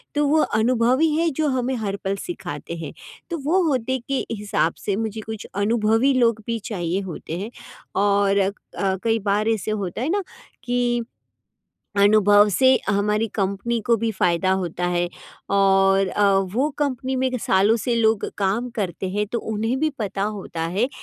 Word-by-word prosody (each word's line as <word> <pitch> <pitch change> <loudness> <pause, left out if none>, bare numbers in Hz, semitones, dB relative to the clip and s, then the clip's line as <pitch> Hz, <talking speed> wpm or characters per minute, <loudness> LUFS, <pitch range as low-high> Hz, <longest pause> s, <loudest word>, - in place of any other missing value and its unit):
तो 295 0 +2
वो 310 +2 +3 0.2
अनुभव 245 +3 +2
ही 320 0 +4
है 330 +1 +2
जो 310 - +2
हमें 260 0 0
हर 200 -1 -2
पल 195 +1 0
सिखाते 170 - -6
हैं। 165 - -7 0.4
तो 340 - -2
वो 365 +5 +3
होदे 260 -2 0
के 275 -1 -1
हिसाब 205 -6 0
से 200 - +1
मुझे 220 0 -3
कुछ 220 -1 -6 0.2
अनुभवी 225 +4 +3
लोग 230 -3 +2
भी 230 0 -1
चाहिए 175 -1 -1
होते 160 +1 -6
हैं 210 +4 -5 0.5
और 200 0 +3
अ, 195 0 +2 0.5
कई 225 0 +2
बार 210 +2 +1
ऐसे 215 -1 -1
होता 200 -1 -3
है 275 - -1
ना 400 +1 0 0.4
कि 245 -1 0 1.0
अनुभव 205 0 +6
से 260 +7 +3 0.2
हमारी 210 +2 +1
कम्पनी 200 +4 -1
को 235 - +4
भी 225 +1 -1
फायदा 180 0 +1
होता 175 0 -3
है 175 0 0 0.4
और 195 0 +4
अ, 205 0 +2 0.2
वो 275 +5 +2
कम्पनी 260 -2 -1
में 260 0 +1
सालों 200 +1 +3
से 235 +1 -1
लोग 220 -2 +2
काम 205 +5 0
करते 185 -3 -2
हैं, 210 +2 -1
तो 235 +3 -2
उन्हें 225 +4 -2
भी 310 - +2
पता 200 -2 -2
होता 200 -5 -4
है 235 +5 +2
215 Hz, 170 wpm, -22 LUFS, 195-245 Hz, 1.0 s, अनुभव